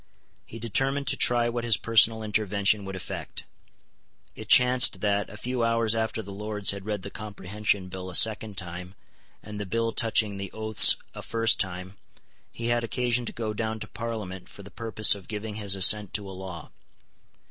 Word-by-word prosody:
He 115 - -10
determined 135 +5 0
to - - 0
try 120 -1 +3
what 120 0 -3
his 115 -3 +3
personal 115 -1 +2
intervention 105 -1 0
would 95 0 -6
effect. 95 - -7 0.9
It - - -10
chanced 125 -6 +5
that, 100 -1 0
a 105 - -11
few 125 +2 -3
hours 115 -1 +2
after 110 0 -2
the 100 0 -9
Lords 105 0 -1
had 100 0 -8
read 105 -3 -3
the 100 - -8
Comprehension 105 -1 -3
Bill 95 0 -8
a 90 - -3
second 110 -2 +3
time 90 +1 -6 0.5
and 105 0 -8
the 105 - -4
Bill 115 +3 -1
touching 110 -3 +1
the 100 0 -7
Oaths 110 -1 +4 0.2
a - - -8
first 115 -1 +1
time, 95 +1 -5 0.5
he 115 0 -5
had 120 0 0
occasion 120 0 -1
to - - -3
go 110 -2 -4
down 110 +1 -4
to - - -6
Parliament 105 -4 -7
for 100 - -13
the 100 - -13
purpose 110 -2 +3
of 100 -3 -9
giving 105 0 -6
his 100 -2 +2
assent 100 +1 +4
to 105 -2 -4
a 95 - -8
law. 95 -4 -9
105 Hz, 185 wpm, -26 LUFS, 100-115 Hz, 0.9 s, chanced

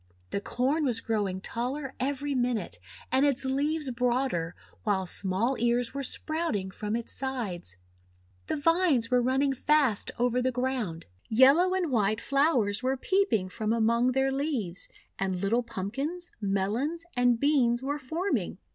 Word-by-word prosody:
The 200 - -2
Corn 270 +9 0
was 245 -5 +1
growing 200 -4 -2
taller 265 +5 -4
every 285 +2 -1
minute, 245 - -1 0.3
and 265 +1 +3
its 275 -2 +2
leaves 285 +2 0
broader, 240 -9 0 0.3
while 195 -3 0
small 195 +8 +1
ears 240 +1 +1
were 280 - -3
sprouting 275 - -2
from 210 +3 -3
its 235 0 -4
sides. 225 - -4 0.7
The - - -1
vines 305 -6 +2
were 250 0 +4
running 265 +3 +2
fast 270 -5 +2
over 245 +1 +1
the 255 +1 +1
ground. 245 -10 -2 0.2
Yellow 280 +11 +5
and 355 -6 -1
white 215 -2 +1
flowers 260 -8 +2
were 260 +1 0
peeping 375 - +1
from 215 +3 -2
among 235 +2 +2
their 265 +1 +2
leaves, 265 - -2 0.3
and 190 -1 0
little 210 +6 +1
Pumpkins, 270 - -4
Melons, 215 - -1
and 245 -2 +3
Beans 260 -4 +2
were 285 +2 -2
forming. 330 +8 -2
250 Hz, 145 wpm, -28 LUFS, 220-280 Hz, 0.7 s, Yellow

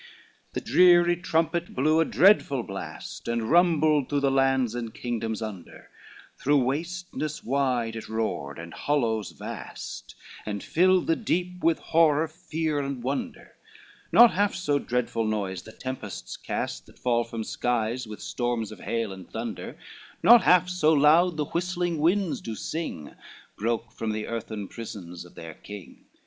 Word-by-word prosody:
III 480 - -22
The - - -2
dreary 175 -1 +5
trumpet 170 0 -1
blew 155 +5 +3
a 165 - +4
dreadful 160 - +4
blast, 100 -2 -7
And 115 0 -1
rumbled 155 -5 +4
through 145 -1 0
the 140 -1 +2
lands 135 -3 +2
and 120 -2 -4
kingdoms 115 -2 -3
under, 100 -6 -9 0.5
Through 145 -1 +3
wasteness 155 +2 -3
wide 125 -3 0
it 115 - -7
roared, 110 -10 -2
and 85 0 -8
hollows 115 -8 0
vast, - - -8 0.3
And 105 -2 -4
filled 185 +2 +3
the 165 - +2
deep 180 -3 -2
with 165 0 +4
horror, 160 -1 +3
fear 160 -2 -3
and 135 -3 -4
wonder, 135 +2 -4 0.6
Not 235 +6 +8
half 205 +1 +1
so 150 -6 0
dreadful 120 -3 -1
noise 100 -4 -2
the 110 - -12
tempests 130 -5 -6
cast, 60 0 -4
That - - -19
fall 120 -1 +1
from 115 -1 -5
skies 120 +1 -1
with 105 -1 -9
storms 120 -3 -2
of 110 - -10
hail 115 -4 -2
and 95 -2 -11
thunder, - - -6 0.5
Not 235 0 +9
half 180 0 +5
so 180 -4 +2
loud 160 +4 +5
the 150 - 0
whistling 175 0 -2
winds 180 +3 +1
do 115 - -5
sing, 130 - -5 0.4
Broke 115 +2 -2
from 110 -1 -3
the 110 0 -3
earthen 110 -3 -5
prisons 90 -7 -8
of 90 - -17
their 80 -1 -8
King. 100 +3 -11
135 Hz, 155 wpm, -26 LUFS, 110-165 Hz, 0.6 s, Not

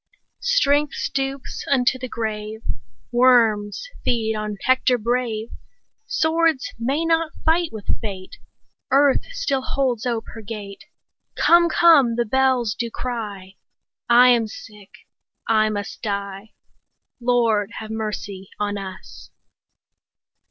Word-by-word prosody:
Strength 290 - +2
stoops 270 0 -3
unto 260 -1 +2
the 255 - -5
grave, 220 -1 -4 0.5
Worms 235 - +3 0.2
feed 220 -2 0
on 210 -1 -4
Hector 255 -1 +3
brave; 235 -1 -2 0.6
Swords 320 -3 +1
may 275 +8 0
not 330 -1 +1
fight 330 +1 +2
with 220 -3 -8 0.2
fate; 190 -4 -7 0.5
Earth 275 0 +3
still 390 - -1
holds 255 -3 -1
ope 230 -2 -2
her 225 - -9
gate; 205 -2 -8 0.5
25 - - -1
Come, 340 0 +6
come! 300 -9 +5
the 240 0 0
bells 255 -2 +2
do 235 0 -3
cry; 205 -6 -6 0.5
I 245 +1 +7
am 235 -2 +3
sick, 210 -2 -12 0.6
I 215 -1 +3
must 205 -2 -5
die— 200 0 -4 0.7
Lord, 230 -4 +2
have 220 0 -7
mercy 210 -3 -5
on 205 -1 -2
us! 190 -1 -10
235 Hz, 115 wpm, -22 LUFS, 210-265 Hz, 0.7 s, I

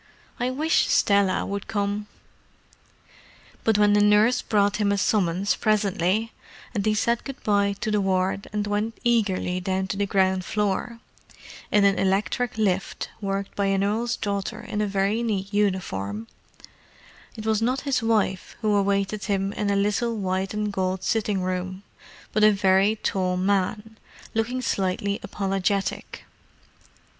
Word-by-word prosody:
"I 245 +1 0
wish 305 +6 +2
Stella 200 -2 +3
would 200 0 -4
come." 205 -1 -2 1.6
But 220 -2 +3
when 205 0 +4
a - - +4
nurse 210 +4 +4
brought 205 -2 +1
him 205 -1 +1
a 200 - +1
summons 195 -1 +1
presently, 210 0 +1 0.4
and 205 -4 -1
he 215 0 +2
said 235 +2 +1
good 275 0 -8
bye 200 -1 +2
to 215 - -1
the 210 -1 +2
ward 190 0 0
and 210 -1 -1
went 210 +2 -2
eagerly 200 -6 +1
down 190 +1 -1
to 195 - -2
the 200 0 0
ground 190 -1 +2
floor 210 +4 -2 0.7
(in 205 -1 +4
an 195 0 +3
electric 205 +5 0
lift 195 -3 -1
worked 195 0 -3
by 200 -1 0
an 195 0 +1
earl's 230 +4 0
daughter 205 +2 -3
in 220 -3 -3
a 210 - +1
very 200 +3 0
neat 200 -3 -2
uniform), 115 - -1 1.1
it 215 - -7
was 220 -1 +1
not 250 +4 0
his 275 -3 0
wife 215 -4 0
who 215 -2 +2
awaited 200 0 0
him 195 -1 -1
in 205 - -2
a 200 - +2
little 210 +4 0
white 190 -1 -1
and 210 -1 -2
gold 185 -1 -1
sitting 210 -4 0
room, 185 +1 -3 0.5
but 215 - +2
a 215 - +8
very 195 +1 +3
tall 185 -4 -1
man, 205 +3 -1 0.3
looking 245 +3 -1
slightly 200 0 -1
apologetic. 195 0 -2
200 Hz, 150 wpm, -25 LUFS, 195-215 Hz, 1.6 s, a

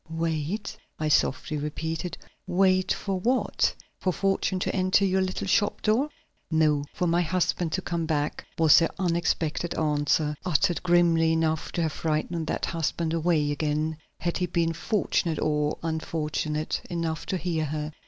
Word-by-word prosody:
"Wait?" 165 +4 -2 0.2
I 155 0 -1
softly 145 +1 +1
repeated. 160 +4 -3 0.3
"Wait 185 0 +3
for 195 -2 -1
what? 245 +7 +1 0.3
For 185 - +1
fortune 195 0 0
to - - -1
enter 185 +1 +3
your 190 0 +2
little 185 0 -2
shop 205 +2 +1
door?" 240 +8 +2 0.4
"No, 155 -3 +2
for 180 - -2
my 170 +1 +3
husband 175 -1 0
to 185 - -1
come 170 -2 -2
back," 150 -2 -1
was 160 -2 +7
her 165 - +2
unexpected 170 -2 0
answer, 150 0 +1
uttered 175 0 +1
grimly 170 -2 +4
enough 160 -1 0
to 170 - 0
have 160 - 0
frightened 160 +1 -2
that - - -1
husband 165 0 -1
away 160 -3 +2
again, 155 +1 -1 0.3
had 170 0 -1
he 180 - 0
been 165 -1 0
fortunate 170 -3 0
or 150 -1 0
unfortunate 155 -1 -2
enough 165 -2 -3
to 190 - 0
hear 170 -3 -1
her. 150 +1 -3
165 Hz, 155 wpm, -27 LUFS, 155-180 Hz, 0.4 s, was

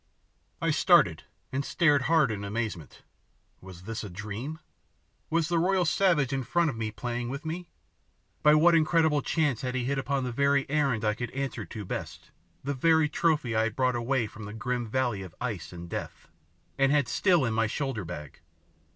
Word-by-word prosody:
I - - +1
started, - - +4 0.3
and 140 +2 -1
stared 150 -2 +3
hard 155 -7 +4
in 100 -1 -4
amazement. 100 - -4 0.6
Was 90 -1 -12
this 115 +3 -5
a 105 - -6
dream? 105 - -6 0.7
Was 165 -1 +1
the 170 -1 +1
royal 185 +1 +2
savage 160 -7 +2
in 135 - 0
front 165 +3 +1 0.2
playing 120 +1 -3
with 140 +5 -6
me? 170 +2 -5 0.7
By 150 0 +6
what 170 +3 +5
incredible 160 -2 +3
chance 150 -4 0
had 125 -1 -3
he 125 -1 -1
hit 135 +1 0
upon 135 0 -1
the 125 - -2
very 140 +2 +2
errand 135 -7 +1
I 105 - +2
could 120 +2 -4
answer 135 0 -3
to 105 -3 -7
best, - - -6 0.3
the 140 +2 -1
very 160 +2 +3
trophy 150 -8 +1
I 110 0 +3
had 115 -1 -3
brought 130 -1 +1
away 120 +1 0
from 110 0 -9
the 105 - -7
grim 120 +1 -2
valley 120 -3 -1
of 95 -4 -10
ice 115 -8 -4
and 85 -1 -8
death, - - -6 0.5
and 135 0 +4
had 145 -4 +3
still 175 -1 +3
in 115 - -1
my 115 0 +2
shoulder 135 -3 -3
bag? 75 -5 -8
130 Hz, 185 wpm, -28 LUFS, 110-150 Hz, 0.7 s, By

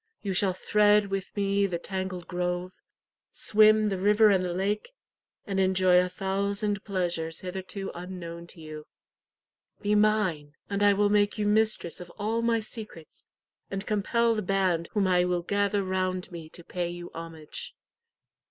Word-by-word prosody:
You 195 -2 -1
shall 190 0 +3
thread 210 +1 +3
with 195 -1 -2
me 200 0 +2
the 175 -3 -2
tangled 185 -1 -4
grove, 180 0 -2 0.6
swim 215 0 +4
the 195 -2 -2
river 210 +2 +5
and 190 -2 +3
the 180 - -2
lake, 200 - -1 0.6
and 195 -2 -2
enjoy 185 -1 +4
a 180 0 +1
thousand 200 +1 -1
pleasures 175 -4 -2
hitherto 190 +2 -5
unknown 170 -1 -7
to 170 - -12
you. 155 -1 -9 1.0
Be 205 +1 +2
mine, 210 -9 +1 0.2
and 200 0 -1
I 205 0 +6
will 205 +1 +2
make 205 0 +2
you 210 - 0
mistress 210 -5 +1
of 175 - -9
all 220 +2 -1
my 230 -1 +2
secrets, 215 -7 -9 0.4
and 195 +1 -4
compel 230 +3 +1
the 215 - -1
band 185 -4 0
whom 205 -3 +2
I 180 -1 +3
will 180 -1 0
gather 200 +1 +1
round 185 0 -2
me 165 -2 -8
to 175 - -11
pay 175 +1 -3
you 175 0 -8
homage. 165 -2 -7
190 Hz, 160 wpm, -28 LUFS, 180-205 Hz, 1.0 s, I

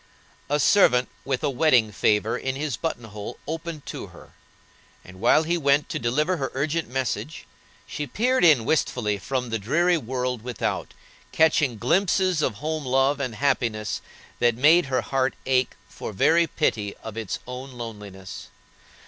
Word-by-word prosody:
A 145 +1 +1
servant 130 - +4
with 135 +1 -2
a 145 - +2
wedding 125 -6 +3
favor 105 +2 +1
in 130 0 -3
his 145 -2 -2
button 140 -2 -3
hole 105 +1 -8
opened 160 -1 -5
to - - -6
her, - - -15 0.7
and, 95 0 -13
while 120 +8 +4
he 170 +2 0
went 140 -1 +2
to - - -3
deliver 150 +10 0
her 135 -3 -2
urgent 155 +4 -1
message, 130 +2 -3 0.4
she 150 - -5
peered 250 - +1
in 150 -10 +6
wistfully 110 -9 0
from 125 +2 -3
the 115 - -1
dreary 170 - +2
world 125 -2 -3
without, 125 +1 -3 0.4
catching 150 -6 +3
glimpses 185 - +2
of 125 -7 0
home 155 +6 -3
love 135 +2 +2
and 130 -5 -3
happiness 115 -5 -1 0.4
that 120 -1 +3
made 155 +6 +5
her 130 -1 0
heart 135 -1 0
ache 130 -1 +1
for - - -7
very 165 - +3
pity 105 -10 -1
of 110 -1 -7
its 110 -4 -3
own 130 +1 -7
loneliness. 105 -5 -8
130 Hz, 155 wpm, -24 LUFS, 115-155 Hz, 0.7 s, in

